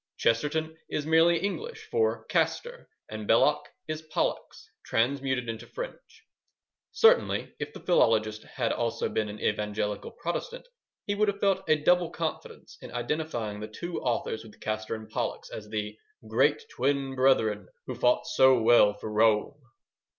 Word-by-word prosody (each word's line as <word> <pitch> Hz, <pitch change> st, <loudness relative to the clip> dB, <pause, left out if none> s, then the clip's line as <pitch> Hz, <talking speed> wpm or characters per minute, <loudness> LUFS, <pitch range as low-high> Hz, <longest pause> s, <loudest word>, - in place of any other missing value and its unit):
Chesterton 155 Hz, +7 st, 0 dB
is 150 Hz, -, -2 dB
merely 165 Hz, +2 st, +5 dB
English 440 Hz, -, -4 dB
for 455 Hz, 0 st, +1 dB
Castor, 485 Hz, 0 st, -1 dB, 0.2 s
and -, -, -7 dB
Belloc -, -, +3 dB, 0.2 s
is 155 Hz, 0 st, -4 dB
Pollux 155 Hz, -1 st, -3 dB
transmuted 130 Hz, +1 st, 0 dB
into 115 Hz, 0 st, -6 dB
French. -, -, -9 dB, 0.7 s
Certainly, 470 Hz, +2 st, +3 dB
if -, -, -4 dB
the -, -, -11 dB
philologist 110 Hz, -10 st, +2 dB
had 120 Hz, -3 st, -2 dB
also 115 Hz, -1 st, -1 dB
been 110 Hz, -1 st, -1 dB
an 105 Hz, +1 st, -8 dB
evangelical 105 Hz, -1 st, -2 dB
Protestant, -, -, -5 dB, 0.4 s
he 205 Hz, -, 0 dB
would 210 Hz, +1 st, +2 dB
have 200 Hz, 0 st, -1 dB
felt 195 Hz, -1 st, +1 dB
a 155 Hz, -, +6 dB
double 175 Hz, +3 st, +3 dB
confidence 165 Hz, -1 st, -6 dB
in -, -, -9 dB
identifying 120 Hz, -4 st, -3 dB
the 105 Hz, -, -5 dB
two 170 Hz, +11 st, -5 dB
authors 115 Hz, -2 st, -2 dB
with 110 Hz, -2 st, -15 dB
Castor 110 Hz, +1 st, -3 dB
and 110 Hz, 0 st, -9 dB
Pollux 110 Hz, -, -4 dB
as 105 Hz, -1 st, -8 dB
the 105 Hz, -1 st, -3 dB, 0.3 s
Great 140 Hz, +7 st, +2 dB
Twin 135 Hz, +1 st, 0 dB
Brethren, 110 Hz, -7 st, +2 dB, 0.2 s
Who 130 Hz, -, -4 dB
fought 125 Hz, 0 st, +2 dB
so 130 Hz, -1 st, +5 dB
well 110 Hz, -2 st, +5 dB
for 105 Hz, +1 st, -7 dB
Rome. 105 Hz, +1 st, +3 dB
130 Hz, 150 wpm, -28 LUFS, 110-170 Hz, 0.7 s, a